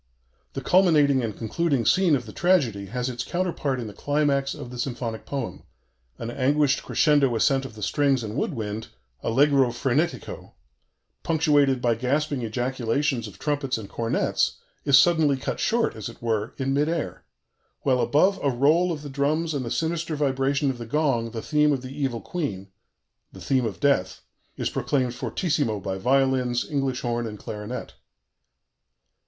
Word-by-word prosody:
The -, -, -4 dB
culminating 155 Hz, -7 st, +4 dB
and 110 Hz, -3 st, -4 dB
concluding 135 Hz, +2 st, 0 dB
scene 185 Hz, -5 st, +4 dB
of 125 Hz, -3 st, -3 dB
the 110 Hz, -, -10 dB
tragedy 130 Hz, -, +1 dB
has 125 Hz, +4 st, -3 dB
its 120 Hz, -1 st, -3 dB
counterpart 170 Hz, -7 st, -2 dB
in 120 Hz, -, -4 dB
the 105 Hz, -, -8 dB
climax 140 Hz, +2 st, 0 dB
of 120 Hz, -, -8 dB
the 125 Hz, -, -8 dB
symphonic 120 Hz, -3 st, -4 dB
poem: 135 Hz, -4 st, -4 dB, 0.6 s
an 115 Hz, -, -5 dB
anguished 140 Hz, +2 st, +2 dB
crescendo 145 Hz, -6 st, +3 dB
ascent 135 Hz, +3 st, +2 dB
of 115 Hz, -5 st, -9 dB
the 105 Hz, -, -7 dB
strings 140 Hz, -1 st, +1 dB
and 110 Hz, 0 st, -5 dB
wood 150 Hz, -, -1 dB
wind, 110 Hz, 0 st, -4 dB, 0.3 s
allegro 135 Hz, +1 st, +3 dB
frenetico, 130 Hz, +7 st, -2 dB, 0.7 s
punctuated 145 Hz, -5 st, +2 dB
by 120 Hz, -1 st, +3 dB
gasping 135 Hz, +4 st, -1 dB
ejaculations 120 Hz, +2 st, -1 dB
of 100 Hz, -, -12 dB
trumpets 145 Hz, -4 st, -1 dB
and 110 Hz, -3 st, -8 dB
cornets, 115 Hz, -1 st, 0 dB, 0.3 s
is 140 Hz, -2 st, +7 dB
suddenly 155 Hz, -2 st, +4 dB
cut 130 Hz, -, -4 dB
short, 235 Hz, 0 st, +1 dB
as 110 Hz, 0 st, -5 dB
it 115 Hz, -, -13 dB
were, 110 Hz, -1 st, -2 dB
in 135 Hz, 0 st, -1 dB
mid 145 Hz, +3 st, +2 dB
air, 165 Hz, -2 st, -3 dB, 0.6 s
while 130 Hz, -3 st, +2 dB
above 185 Hz, +7 st, +3 dB
a 140 Hz, -, +2 dB
roll 150 Hz, +8 st, +3 dB
of 150 Hz, -3 st, -5 dB
the -, -, -6 dB
drums 155 Hz, +4 st, 0 dB
and 140 Hz, -3 st, -2 dB
the 115 Hz, -, -4 dB
sinister 160 Hz, +3 st, -1 dB
vibration 140 Hz, 0 st, +1 dB
of 125 Hz, -, -9 dB
the 120 Hz, -, -6 dB
gong 130 Hz, -4 st, +1 dB
the 115 Hz, -1 st, -6 dB
theme 150 Hz, -1 st, +3 dB
of 135 Hz, -3 st, -1 dB
the 130 Hz, +1 st, -8 dB
Evil 135 Hz, -6 st, -2 dB
Queen 100 Hz, -, -4 dB, 0.6 s
the -, -, -12 dB
theme 130 Hz, -3 st, +1 dB
of 105 Hz, -, -6 dB
Death 95 Hz, -11 st, +1 dB, 0.4 s
is -, -, -1 dB
proclaimed 130 Hz, -4 st, 0 dB
fortissimo 145 Hz, -, -1 dB
by 95 Hz, 0 st, -4 dB
violins, 130 Hz, 0 st, +1 dB
English 135 Hz, -3 st, -1 dB
horn, 120 Hz, -1 st, -1 dB
and 105 Hz, -1 st, -7 dB
clarinet. 105 Hz, +4 st, -6 dB
135 Hz, 165 wpm, -25 LUFS, 120-150 Hz, 0.7 s, is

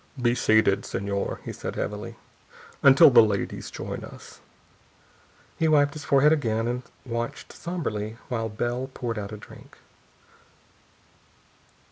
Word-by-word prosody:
"Be 120 Hz, -1 st, +2 dB
seated, 110 Hz, -4 st, +3 dB
Señor," 100 Hz, 0 st, -3 dB
he -, -, -6 dB
said -, -, -6 dB
heavily, -, -, -4 dB, 0.7 s
"until 140 Hz, 0 st, +8 dB
the 125 Hz, -, +9 dB
ladies 105 Hz, -3 st, -1 dB
join -, -, -6 dB
us." -, -, -12 dB, 1.2 s
He 160 Hz, -, +3 dB
wiped 145 Hz, -2 st, +4 dB
his 155 Hz, -2 st, -8 dB
forehead 145 Hz, +3 st, +5 dB
again 115 Hz, -6 st, 0 dB
and 125 Hz, +1 st, -2 dB, 0.2 s
watched 115 Hz, -1 st, -5 dB
somberly 110 Hz, -11 st, -4 dB
while 115 Hz, -3 st, -2 dB
Bell 120 Hz, +4 st, -3 dB
poured 115 Hz, -3 st, -3 dB
out 100 Hz, 0 st, -6 dB
a 105 Hz, -, -6 dB
drink. -, -, -15 dB
120 Hz, 125 wpm, -26 LUFS, 110-140 Hz, 1.2 s, the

